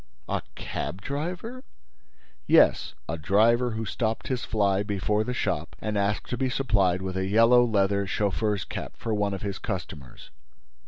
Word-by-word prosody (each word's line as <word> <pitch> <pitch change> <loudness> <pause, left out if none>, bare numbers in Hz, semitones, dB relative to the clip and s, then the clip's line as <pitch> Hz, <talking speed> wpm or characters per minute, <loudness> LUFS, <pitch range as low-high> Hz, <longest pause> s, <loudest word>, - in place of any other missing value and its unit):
"A - - -1
cab 95 - -4
driver!" 180 - -4 0.8
"Yes, - - +4
a 80 +1 -3
driver 115 +9 +3
who 110 0 -3
stopped 110 +1 -2
his 130 -2 -1
fly 100 -3 +1
before 105 +1 0
the 125 - -3
shop 85 -6 -2
and 110 -1 -3
asked 100 +1 0
to 125 - -1
be 130 -1 +1
supplied 100 -9 +1
with 95 -1 -4
a 95 0 -1
yellow 115 +4 +6
leather 100 -3 +1
chauffeur's 100 0 0
cap - - -6
for 115 - -3
one 100 -1 0
of 95 - -8
his 100 -1 -3
customers. 80 - -6
105 Hz, 160 wpm, -26 LUFS, 95-115 Hz, 0.8 s, yellow